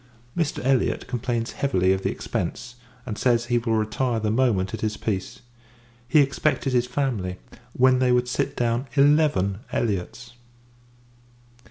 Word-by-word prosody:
Mr. 160 -7 -2
Elliot 135 -2 +1
complains 120 -1 -2
heavily 95 -9 +1
of 95 - -2
the - - 0
expence; 120 +2 -4 0.3
and 110 -4 -5
says, 120 -2 +2
he 120 0 +1
will 115 -1 0
retire 110 +2 0
the 105 -1 -1
moment 110 -6 +1
it 110 - -5
is 105 -1 -1
peace. 105 +4 -4 0.7
He 150 +3 +5
expected 140 -1 0
his 125 0 +2
family, 120 -9 -2 0.4
when 130 0 +4
they 130 -1 +3
would 125 0 +2
sit 140 +3 -1
down 120 +2 0
eleven 140 -10 +3
Elliots! 115 +3 -3
120 Hz, 145 wpm, -24 LUFS, 110-130 Hz, 0.7 s, He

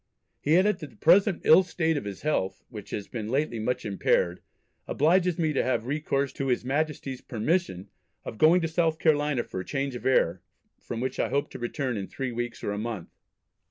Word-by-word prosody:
He 155 +4 +3
added 205 +1 +3
that 155 -4 -8
the - - -21
present 190 +3 +4
ill 160 - +8
state 165 -3 -1
of 145 - -3
his 100 -2 -7
health, 145 -11 -1
"which 105 -5 -9
has 100 - -5
been 110 -3 -5
lately 135 -2 0
much 125 +3 -2
impaired, 90 -3 +1 0.5
obliges 175 +3 +2
me 160 -3 +1
to - - +2
have 125 -3 0
recourse 140 0 -1
to 135 - -3
his 125 -1 0
Majesty's 140 -1 -2
permission 115 - -1 0.4
of 110 - -7
going 165 +4 +6
to 165 - 0
South 160 -1 +1
Carolina 150 -5 +2
for 95 - -6
change 135 +5 -2
of 125 - -4
air, 90 -9 +2 0.4
from 115 -1 -5
which 130 - -3
I - - +1
hope 140 0 -1
to - - -8
return 120 0 -2
in 100 - -4
three 130 -2 -4
weeks 120 0 -5
or - - -1
a 105 - -3
month." 110 -6 -5
135 Hz, 200 wpm, -27 LUFS, 115-160 Hz, 0.5 s, ill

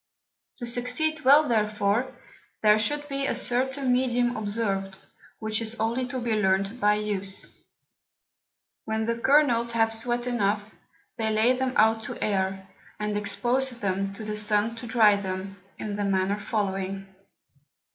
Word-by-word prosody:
To 240 - -5
succeed 250 +6 0
well 290 +4 +6
therefore, 215 +2 +1 0.5
there 210 0 +5
should 290 +6 -1
be 275 -1 -2
a - - -1
certain 260 +2 0
Medium 245 -1 +1
observed, 205 -3 -2 0.4
which 220 0 -2
is 225 0 -1
only 235 +3 0
to 255 +1 -4
be 240 -1 -2
learnt 195 +2 +1
by 210 -2 +4
use. 200 -2 -2 1.3
When 220 0 -1
the 230 +1 0
Kernels 240 -4 +3
have 225 -1 +2
sweat 240 +2 -1
enough, 210 -4 0 0.5
they 220 -2 0
lay 220 +3 +3
them 260 0 -1
out 220 +1 +3
to - - -6
air, 190 -1 -1 0.3
and 210 0 -2
expose 245 +5 0
them 195 -5 -2
to 220 - -7
the 210 0 -3
Sun 210 +2 +1
to 235 - -7
dry 220 -3 +5
them, 195 0 -5 0.2
in 210 -1 -4
the 205 - -1
manner 195 +1 0
following. 195 -2 -2
220 Hz, 145 wpm, -26 LUFS, 205-245 Hz, 1.3 s, well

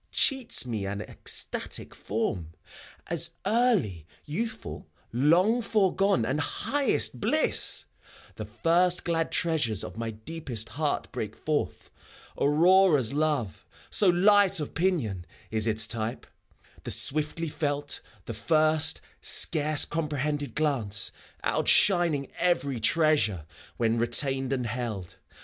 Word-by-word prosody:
— - - -44 0.2
Cheats 265 - 0
me 110 -5 -4
an 100 +1 -4
ecstatic 110 - -1
form, 100 -7 -4 0.5
As - - +1
early 200 - +1 0.2
youthful, 220 +9 -5 0.3
long 175 - +3
foregone 195 - +1
and 135 +5 -1
highest 285 - 0
bliss 310 - +3 0.4
T - - -24
The - - -5
first 175 +2 +1
glad 165 -1 -1
treasures 145 - 0
of - - -9
my 115 -1 -3
deepest 115 0 -6
heart 145 +5 -3
break 110 -4 -5
forth; 155 -1 -3 0.4
Aurora's 155 - +3
love, 145 -8 -1 0.3
so 200 - +4
light 195 +1 +4
of 150 - -5
pinion, 145 - -1 0.3
is 110 0 +1
its 110 0 +3
typey 115 0 -4 0.6
The - - -6
swiftly 155 +3 +1
felt, 145 -1 -2 0.2
the 115 - -6
first, 155 +6 +2 0.2
scarce 155 -2 +3
comprehended 150 -2 -3
glance, 120 -10 +1 0.3
Outshining 170 -8 +2
every 140 -8 0
treasure, 145 - +1 0.3
when 115 0 0
retained 135 +3 +1
and 130 -3 -1
held. 110 -6 -5
145 Hz, 115 wpm, -27 LUFS, 115-170 Hz, 0.6 s, so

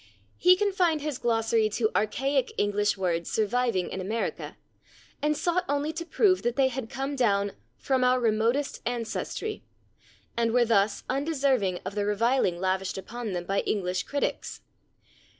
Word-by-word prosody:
He 360 +1 +7
confined 365 -6 +1
his 295 -3 -3
glossary 225 -1 +2
to 220 +1 0
archaic 265 +5 0
English 205 0 +1
words 170 -3 -1
surviving 220 -3 0
in 190 - -4
America, 220 +5 -3 0.6
and 300 0 +1
sought 355 +1 +1
only 290 +2 0
to 335 +1 -5
prove 375 -2 +3
that 240 0 -1
they 270 -2 +3
had 255 -3 -5
come 270 +2 -3
down 200 -6 +2 0.3
"from 260 -2 0
our 250 0 +4
remotest 235 +5 +1
ancestry" 245 - -3 0.7
and 230 -1 +1
were 245 -1 +4
thus 205 -2 +2
undeserving 265 - 0
of 190 - -4
the 205 0 -1
reviling 215 -2 +2
[Pg032] - - -10
lavished 190 0 -1
upon 215 +2 -5
them 175 -1 -3
by 195 +2 0
English 185 -3 -1
critics. 285 +8 -3
235 Hz, 150 wpm, -27 LUFS, 205-275 Hz, 0.7 s, He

